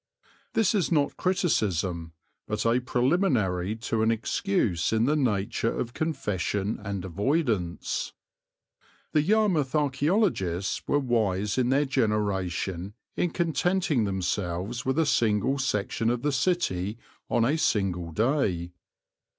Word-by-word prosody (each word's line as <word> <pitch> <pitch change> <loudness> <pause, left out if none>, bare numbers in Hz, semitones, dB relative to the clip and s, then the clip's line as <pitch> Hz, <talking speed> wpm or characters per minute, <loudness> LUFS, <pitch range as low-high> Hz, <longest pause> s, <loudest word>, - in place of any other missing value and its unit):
This 225 -1 +3
is 195 -6 +1
not 145 -3 +2
criticism, 95 - 0 0.3
but 105 +1 -2
a 115 +2 +3
preliminary 125 - +1
to 115 - 0
an 110 - +3
excuse 115 - 0
in 110 +1 +2
the 150 +4 +2
nature 115 -4 0
of 120 0 -3
confession 105 - -2
and 100 -2 -4
avoidance. 100 - -1 1.0
The 150 - +3
Yarmouth 185 -7 +2
archæologists 145 - +1
were 145 - +3
wise 110 -5 0
in 125 -1 +2
their 140 +3 +3
generation 100 -6 -1 0.2
in 175 - +1
contenting 170 - +1
themselves 95 +4 -2
with 130 +2 +1
a 160 - +3
single 120 +1 +2
section 115 -2 0
of 120 +1 -1
the 150 - +2
city 115 - 0 0.3
on 115 - +2
a 140 +6 +2
single 95 - 0
day. 95 - 0
115 Hz, 120 wpm, -27 LUFS, 95-145 Hz, 1.0 s, This